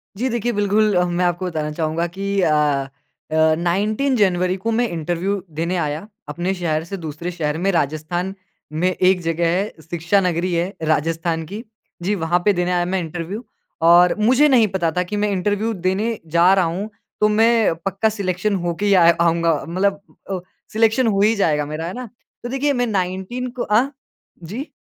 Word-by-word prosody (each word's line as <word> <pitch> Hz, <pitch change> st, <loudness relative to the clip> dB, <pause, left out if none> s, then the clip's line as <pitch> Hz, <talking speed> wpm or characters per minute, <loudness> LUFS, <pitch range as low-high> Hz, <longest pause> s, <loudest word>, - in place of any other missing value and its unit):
जी 250 Hz, +6 st, -1 dB
देखिए, 240 Hz, 0 st, -1 dB
बिल्कुल 205 Hz, 0 st, +2 dB
अ, 180 Hz, -, +3 dB
मैं 175 Hz, 0 st, 0 dB
आपको 175 Hz, +1 st, -1 dB
बताना 155 Hz, -3 st, -3 dB
चाहूँगा 160 Hz, +2 st, -1 dB
कि 200 Hz, 0 st, 0 dB
अ 165 Hz, -, +3 dB, 0.8 s
अ, 160 Hz, 0 st, +3 dB
19 210 Hz, +10 st, 0 dB
जनवरी 185 Hz, -4 st, +2 dB
को 225 Hz, +4 st, -2 dB
मैं 240 Hz, +1 st, +1 dB
इंटरव्यू 175 Hz, +4 st, -2 dB, 0.2 s
देने 170 Hz, +2 st, 0 dB
आया 155 Hz, +3 st, -3 dB, 0.2 s
अपने 175 Hz, +5 st, -2 dB
शहर 160 Hz, -3 st, -1 dB
से 195 Hz, +3 st, -6 dB
दूसरे 165 Hz, +1 st, -5 dB
शहर 155 Hz, -3 st, -2 dB
में 195 Hz, +4 st, +1 dB
राजस्थान 170 Hz, +4 st, -1 dB, 0.4 s
में 175 Hz, +4 st, +1 dB
एक 185 Hz, 0 st, +2 dB
जगह 165 Hz, 0 st, 0 dB
है, 190 Hz, +5 st, 0 dB
शिक्षा 170 Hz, +4 st, 0 dB
नगरी 180 Hz, 0 st, 0 dB
है 175 Hz, +4 st, -1 dB
राजस्थान 165 Hz, +1 st, 0 dB
की। 205 Hz, +7 st, -7 dB, 0.4 s
जी, 205 Hz, +4 st, +1 dB
वहाँ 175 Hz, -1 st, +1 dB
पे 205 Hz, -, +5 dB
देने 180 Hz, 0 st, 0 dB
आया 175 Hz, -1 st, +1 dB
मैं 190 Hz, +1 st, -1 dB
इंटरव्यू 175 Hz, +6 st, -5 dB, 0.4 s
और 175 Hz, +1 st, +6 dB
मुझे 255 Hz, +7 st, +4 dB
नहीं 235 Hz, -5 st, +5 dB
पता 185 Hz, -4 st, -1 dB
था 180 Hz, +3 st, 0 dB
कि 180 Hz, +4 st, -5 dB
मैं 210 Hz, 0 st, +1 dB
इंटरव्यू 205 Hz, +4 st, 0 dB
देने 195 Hz, +5 st, -1 dB, 0.2 s
जा 180 Hz, +3 st, +6 dB
रहा 190 Hz, -2 st, +3 dB
हूँ 185 Hz, +6 st, -3 dB, 0.3 s
तो 210 Hz, -, +5 dB
मैं 225 Hz, -3 st, +3 dB
पक्का 195 Hz, +3 st, +1 dB
सेलेक्शन 200 Hz, -1 st, -1 dB
हो 175 Hz, -1 st, 0 dB
के 205 Hz, -, -1 dB
ही 200 Hz, -, +4 dB
आ 180 Hz, -3 st, +6 dB, 0.2 s
आऊँगा 170 Hz, 0 st, +3 dB
मतलब 195 Hz, +3 st, 0 dB, 0.3 s
अ, 190 Hz, -1 st, -2 dB, 0.3 s
सेलेक्शन 225 Hz, +3 st, +3 dB
हो 200 Hz, -2 st, +2 dB
ही 220 Hz, +2 st, +4 dB
जाएगा 150 Hz, -7 st, +1 dB
मेरा, 155 Hz, +2 st, -5 dB
है 180 Hz, -, -5 dB
ना? 250 Hz, -3 st, -7 dB, 0.3 s
तो 240 Hz, -, -4 dB
देखिए 280 Hz, +2 st, 0 dB
मैं 245 Hz, -1 st, 0 dB
19 190 Hz, +5 st, -2 dB
को -, -, 0 dB
अ, 225 Hz, +6 st, +2 dB, 0.5 s
जी? 225 Hz, -, -6 dB
185 Hz, 190 wpm, -20 LUFS, 170-210 Hz, 0.8 s, और